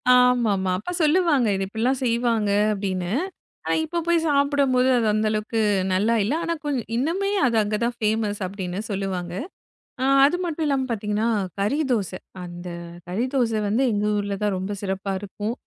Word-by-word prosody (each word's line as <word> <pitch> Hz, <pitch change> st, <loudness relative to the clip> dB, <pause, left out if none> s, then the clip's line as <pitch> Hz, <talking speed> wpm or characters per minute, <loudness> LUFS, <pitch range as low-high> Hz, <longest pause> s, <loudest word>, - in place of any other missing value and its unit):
ஆமாமா 230 Hz, -7 st, +3 dB
அப்பா 210 Hz, -, -5 dB
சொல்லுவாங்க. 305 Hz, -6 st, +3 dB
இத 195 Hz, -, -1 dB
இப்டிலாம் 245 Hz, +6 st, -1 dB
செய்வாங்க 230 Hz, -3 st, +1 dB, 0.2 s
அப்டின்னு. 185 Hz, -3 st, -2 dB, 0.5 s
ஆனா -, -, +1 dB
இப்ப 340 Hz, +2 st, -2 dB
போய் 340 Hz, -1 st, +3 dB
சாப்டும்போது 280 Hz, -3 st, +3 dB
அது 235 Hz, -, +1 dB
அந்த 215 Hz, +1 st, +1 dB
அளவுக்கு 215 Hz, +1 st, -1 dB, 0.3 s
நல்லா 215 Hz, +5 st, +2 dB
இல்ல. 225 Hz, -, 0 dB
ஆனா 335 Hz, 0 st, 0 dB
கொஞ் 280 Hz, -4 st, 0 dB, 0.2 s
இன்னுமே 345 Hz, +10 st, 0 dB, 0.2 s
அது 235 Hz, -, +1 dB
அங்க 210 Hz, +1 st, -1 dB
தான் 240 Hz, 0 st, -2 dB
ஃபேமஸ் 215 Hz, -1 st, 0 dB
அப்டின்னு 190 Hz, 0 st, -4 dB
சொல்லுவாங்க. 190 Hz, -3 st, -3 dB, 0.9 s
அது 295 Hz, +5 st, +3 dB
மட்டுமில்லாம 295 Hz, -5 st, 0 dB
பாத்தீங்கன்னா 210 Hz, 0 st, -1 dB, 0.3 s
கறி 215 Hz, +10 st, +1 dB
தோசை. 195 Hz, -6 st, -1 dB, 0.3 s
அந்த 175 Hz, 0 st, -8 dB, 0.4 s
கறி 200 Hz, +7 st, -1 dB
தோசை 230 Hz, -4 st, +2 dB
வந்து 225 Hz, +6 st, +2 dB
எங்க 205 Hz, 0 st, 0 dB
ஊர்ல 200 Hz, -1 st, -2 dB
தான் 205 Hz, -2 st, +1 dB
ரொம்ப 190 Hz, +2 st, -3 dB
சிறப்பா 195 Hz, 0 st, -2 dB
இருக்கும். 205 Hz, +3 st, -4 dB
220 Hz, 155 wpm, -24 LUFS, 200-260 Hz, 0.9 s, ஆமாமா